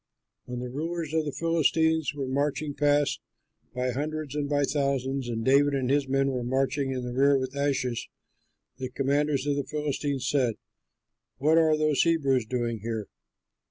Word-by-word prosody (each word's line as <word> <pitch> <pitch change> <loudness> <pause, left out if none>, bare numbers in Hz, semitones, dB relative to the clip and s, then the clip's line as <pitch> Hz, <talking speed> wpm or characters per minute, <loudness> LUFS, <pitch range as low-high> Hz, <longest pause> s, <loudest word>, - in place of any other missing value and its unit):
When 125 0 -5
the 125 - -5
rulers 160 +2 -3
of 160 -1 +1
the 145 - -2
Philistines 160 +1 +1
were 140 -2 -3
marching 145 +2 -1
past, 145 0 +2 0.5
by 125 0 0
hundreds 150 +2 -3
and 145 -1 -2
by 145 -1 +2
thousands, 135 -2 -1
and 115 -1 -3
David 140 +2 +4
and 130 -1 0
his 140 -1 +2
men 135 +1 +2
were 125 -2 -2
marching 135 +2 0
in 130 -1 -3
the 125 0 -4
rear 140 +2 +4
with 130 0 -4
Achish, 140 -4 -1 0.7
the 130 -1 -4
commanders 140 +1 0
of 145 -1 0
the 140 - 0
Philistines 145 -2 -2
said, 125 -6 +1 0.8
"What 155 +4 +4
are 160 -1 +4
those 155 -2 +2
Hebrews 140 -8 +2
doing 120 -2 -2
here?" 110 0 -4
140 Hz, 165 wpm, -27 LUFS, 130-150 Hz, 0.8 s, David